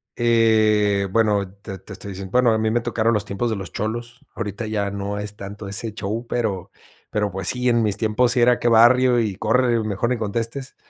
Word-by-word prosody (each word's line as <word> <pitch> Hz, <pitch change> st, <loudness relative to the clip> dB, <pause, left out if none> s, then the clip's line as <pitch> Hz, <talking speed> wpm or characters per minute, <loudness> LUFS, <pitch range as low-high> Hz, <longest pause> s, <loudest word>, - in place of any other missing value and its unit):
eh, 110 Hz, -4 st, +3 dB
bueno, 105 Hz, -4 st, +1 dB
te 95 Hz, -3 st, -8 dB
te 100 Hz, -, -11 dB
estoy 100 Hz, +1 st, -9 dB
diciendo, 95 Hz, 0 st, -8 dB
bueno, 125 Hz, -2 st, +4 dB
a 110 Hz, -, +2 dB
mí 110 Hz, 0 st, +1 dB
me 120 Hz, 0 st, +1 dB
tocaron 115 Hz, -1 st, 0 dB
los 105 Hz, 0 st, -1 dB
tiempos 105 Hz, +4 st, -2 dB
de 110 Hz, -, -1 dB
los 95 Hz, -1 st, -7 dB
cholos. 120 Hz, +5 st, -5 dB
Ahorita 105 Hz, 0 st, -4 dB
ya 100 Hz, -2 st, -2 dB
no 100 Hz, 0 st, -4 dB
es 105 Hz, 0 st, -6 dB
tanto 100 Hz, +1 st, -8 dB
ese 105 Hz, +2 st, -4 dB
show, 110 Hz, +3 st, -4 dB
pero 100 Hz, -6 st, -2 dB, 0.4 s
pero 105 Hz, -2 st, -1 dB
pues 95 Hz, -1 st, -4 dB
sí, 125 Hz, 0 st, +1 dB
en 120 Hz, -1 st, +3 dB
mis 105 Hz, -1 st, 0 dB
tiempos 120 Hz, +2 st, +2 dB
sí 125 Hz, -, +1 dB
era 125 Hz, 0 st, +4 dB
qué 120 Hz, -, 0 dB
barrio 120 Hz, +2 st, +5 dB
y 105 Hz, -4 st, -1 dB
corre, 120 Hz, +1 st, +2 dB
mejor 110 Hz, +3 st, -1 dB
ni 125 Hz, -, 0 dB
contestes. 115 Hz, +5 st, -4 dB
110 Hz, 215 wpm, -22 LUFS, 100-120 Hz, 0.4 s, barrio